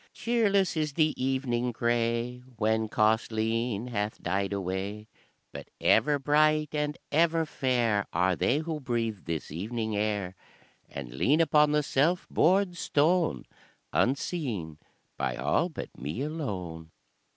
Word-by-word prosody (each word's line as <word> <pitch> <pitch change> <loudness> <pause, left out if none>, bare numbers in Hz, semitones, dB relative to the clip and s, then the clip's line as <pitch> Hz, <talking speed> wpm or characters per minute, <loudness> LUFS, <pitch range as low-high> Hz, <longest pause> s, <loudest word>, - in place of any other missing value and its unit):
"Cheerless 205 -6 +2
is 155 -2 -1
the 155 0 +2
evening 125 -2 0
grey 120 +1 0 0.2
When 110 0 +1
Causleen 110 +1 0
hath 105 -2 -2
died 95 +3 -1
away, 100 +2 -3 0.4
But - - -9
ever 150 -1 +4
bright 150 +2 +2
and 150 0 -1
ever 165 +1 +3
fair 120 -8 0
Are 90 +2 +2
they 125 - +1
who 160 0 -3
breathe 115 -6 -2
this 80 -3 -4
evening 110 +6 -3
air, 105 -3 -1 0.5
And 65 -4 -7
lean 140 - +2
upon 150 -2 +4
the 150 0 +2
self 155 +5 +1
bored 180 +1 +3
stone 165 +3 +1 0.5
Unseen 120 - -1 0.4
by - - -1
all 75 - +1
but 160 - -8
me 75 - -4
alone." 95 - -5
120 Hz, 125 wpm, -28 LUFS, 105-150 Hz, 0.5 s, ever